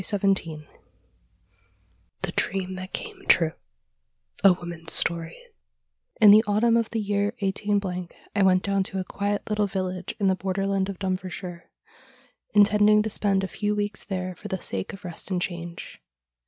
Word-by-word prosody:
215 195 -6 0
XVII 150 - -20 1.6
THE - - 0
DREAM 190 0 -1
THAT 185 +1 -7
CAME 420 -4 -6
TRUE 165 -3 +5 0.9
A 195 -2 +8
WOMAN'S 170 -2 -6
STOKY 165 -1 +2 0.8
In 210 -2 +9
the 215 +2 +8
autumn 225 +3 +3
of 230 -1 +1
the 225 - -2
year 205 +1 0
18 205 +1 0 0.4
— - - -28
I 205 - +2
went 185 -1 +4
clown 195 -1 +1
to 190 0 -3
a - - -1
quiet 205 +2 -2
little 210 -1 +1
village 185 -1 -4
in 200 - +1
the 190 - +4
borderland 195 +1 -1
of 195 - -5
Dumfriesshire, 185 -2 -5 0.9
intending 210 +1 +5
to 220 - -3
spend 195 -2 +1
a - - -1
few 210 +2 -1
weeks 205 0 -2
there 185 -2 -4
for 210 - -10
the 190 -2 -3
sake 95 - -3
of 195 0 -11
rest 175 +1 -7
and 185 -2 0
change. 175 -1 -6
195 Hz, 165 wpm, -25 LUFS, 185-205 Hz, 1.6 s, In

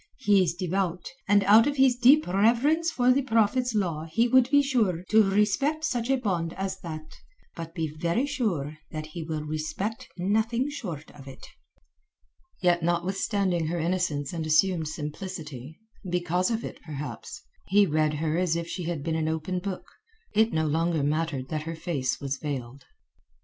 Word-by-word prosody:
He 205 -7 +4
is 170 -2 0
devout, 180 0 -2 0.2
and 205 0 +4
out 215 +5 +6
of 290 0 -1
his 265 -2 +5
deep 260 +5 +5
reverence 240 - +2
for 250 -6 +3
the 270 +2 +3
Prophet's 230 0 +1
law 165 -6 -1
he 230 +9 +3
would 255 0 +4
be 285 0 +5
sure 215 - +1
to 220 0 +7
respect 210 +11 +1
such 245 -5 -1
a 270 - +3
bond 180 -9 -2
as 190 0 -4
that. 155 -3 -8 0.4
But 165 -1 -8
be 165 -2 -1
very 170 - -1
sure 175 - -2
that 155 0 -5
he 170 - -5
will 155 -1 -4
respect 155 +8 -4
nothing 220 +8 0
short 170 - -6
of 140 -2 -14
it." 135 - -11 1.2
Yet 175 -1 +3
notwithstanding 175 +1 0
her 170 +2 -2
innocence 165 -4 -1
and 165 -2 -3
assumed 160 +1 +2
simplicity—because 175 - -4
of 230 -1 -2
it, - - -8
perhaps—he 150 - -2
read 155 -2 +1
her 155 +2 -1
as 180 -3 +1
if 170 0 -3
she 175 0 -5
had 165 -4 -3
been 165 - -1
an 160 -1 0
open 160 +3 -2
book; 190 0 -5 0.5
it 220 +1 +3
no 160 -3 0
longer 160 0 +1
mattered 150 -3 -1
that 155 -1 -2
her 165 - -4
face 140 -6 -2
was 140 0 -3
veiled. 135 -3 -6
175 Hz, 165 wpm, -27 LUFS, 155-220 Hz, 1.2 s, to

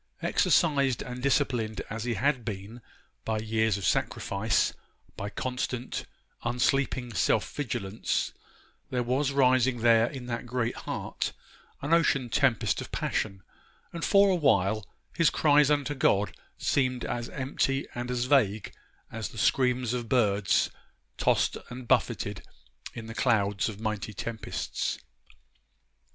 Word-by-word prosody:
Exercised 140 -7 +2
and 125 0 -7
disciplined 125 -5 0
as 115 +2 -5
he 120 -2 -1
had 130 +3 +1
been 105 +2 -6 0.4
by 110 -1 -1
years 110 -1 +1
of 100 - -4
sacrifice, 100 +3 +1 0.4
by 100 - -4
constant, 125 +1 -3 0.4
unsleeping 125 0 0
self 95 - +2
vigilance, 110 -7 -2 0.6
there 125 -1 0
was 130 +4 +1
rising 130 -3 +3
there 115 0 +5
in 130 -3 -7
that 120 0 -4
great 125 -1 -1
heart - - -4 0.5
an 145 +4 +1
ocean 140 -7 +3
tempest 130 -6 +2
of - - -8
passion; 95 -4 -2 0.5
and 170 - -5
for 200 -1 +5
a - - +3
while 110 - +2 0.3
his 170 -2 +4
cries 150 -1 +4
unto 145 -1 +1
God 105 -7 +2 0.2
seemed 130 -2 0
as 120 -1 -3
empty 135 0 -1
and 120 0 -4
as 125 -1 0
vague 110 -7 +2 0.4
as - - -4
the - - -12
screams 125 -2 +2
of 120 -2 -3
birds 100 -5 +2 0.5
tossed - - +2
and 125 0 -8
buffeted - - +1 0.5
in 115 - -6
the 115 - -7
clouds 105 -4 +1
of 105 -2 -8
mighty 110 -1 -3
tempests. 115 +2 -3
120 Hz, 130 wpm, -28 LUFS, 110-135 Hz, 0.6 s, there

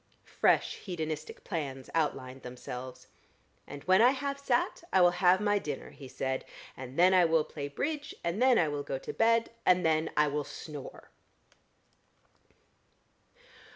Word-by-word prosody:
Fresh - - +1
hedonistic 160 -5 -5
plans 140 -7 -4
outlined 135 -5 -2
themselves. 125 0 -8 0.6
"And 145 -1 -9
when 185 +2 +5
I 240 - +7
have 280 +1 -2
sat, 265 +2 0
I 190 - +4
will 175 -1 +6
have 180 0 +5
my 205 -1 +2
dinner," 145 -7 -6
he 140 - -11
said. 130 +1 -3 0.3
"And 130 +1 -9
then 180 +2 +6
I 185 -1 +6
will 160 -1 +3
play 145 -2 -6
Bridge, 290 - -4
and 170 +7 -2
then 255 -2 +5
I 160 - +3
will 145 -1 -2
go 140 -1 -4
to - - -7
bed, 230 0 +2
and 180 -1 +3
then 160 0 +2
I 150 0 +5
will 145 +1 -1
snore!" 145 -1 -9
160 Hz, 155 wpm, -30 LUFS, 140-195 Hz, 0.6 s, I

